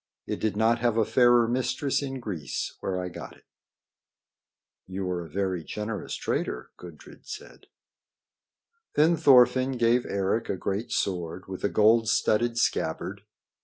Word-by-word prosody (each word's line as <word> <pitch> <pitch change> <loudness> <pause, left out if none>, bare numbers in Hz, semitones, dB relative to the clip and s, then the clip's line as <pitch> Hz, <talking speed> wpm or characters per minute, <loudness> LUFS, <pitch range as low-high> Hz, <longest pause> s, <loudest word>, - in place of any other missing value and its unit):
It - - -4
did 105 -2 -1
not 115 +2 +3
have 120 -1 +1
a 110 - +3
fairer 120 -1 +4
mistress 130 +4 0
in 135 -2 -4
Greece 85 - -4
where 95 -1 -2
I 90 - -3
got 90 - -9
it." - - -27 1.4
"You 95 0 -4
are 90 -1 -2
a 80 - -11
very 95 0 -2
generous 105 +3 -5
trader," 60 - -3
Gudrid 85 -4 -13
said. - - -10 1.3
Then 160 +3 +4
Thorfinn 130 -3 +5
gave 120 0 +2
Eric 100 +3 -1
a 95 - -1
great 100 +5 -3
sword 90 -1 -2
with 95 -1 -7
a 100 - +2
gold 110 +1 +4
studded 115 +1 +1
scabbard. 95 -2 -1
110 Hz, 145 wpm, -27 LUFS, 95-120 Hz, 1.4 s, Thorfinn